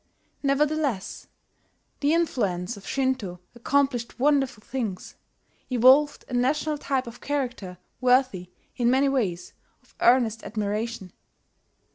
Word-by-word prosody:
Nevertheless, 280 -6 0 0.7
the 290 +1 +2
influence 210 - -1
of 200 - -13
Shinto 260 -10 -1
accomplished 245 -1 0
wonderful 270 -5 +1
things, 220 -8 -5 0.5
evolved 260 +4 +4
a - - -9
national 290 +4 0
type 270 -2 -1
of 235 0 -10
character 250 -10 -3 0.2
worthy, 250 -8 +2 0.3
in 240 -2 +2
many 270 +2 +3
ways, 205 -11 -2 0.3
of - - -27
earnest 235 -3 +3
admiration. 210 -2 -3
250 Hz, 105 wpm, -25 LUFS, 215-275 Hz, 0.7 s, evolved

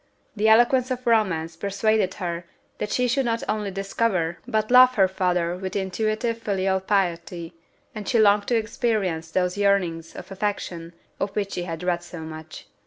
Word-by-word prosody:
The 215 +1 +2
eloquence 240 +3 +5
of 255 -1 -4
romance 185 -8 +1
persuaded 200 +1 0
her 175 -2 -4 0.3
that 210 - -2
she 250 +3 +1
should 265 +2 +1
not 230 -1 -1
only 210 -1 -1
discover 195 -3 -1
but 215 +1 0
love 255 0 +7
her 195 -2 +5
father 180 -2 0
with 190 +1 -6
intuitive 215 +4 -1
filial 195 -3 0
piety, 175 -3 -1 0.4
and 210 -2 -6
she 240 - +2
longed 205 -1 +4
to 240 - +2
experience 215 -8 -1
those 180 +3 0
yearnings 180 -5 +1
of - - -10
affection 185 -4 -3 0.3
of 195 0 -3
which 200 -1 -1
she 175 - -3
had 165 -1 -5
read 175 -1 0
so 175 -1 -9
much. 160 0 -9
195 Hz, 170 wpm, -24 LUFS, 175-220 Hz, 0.4 s, love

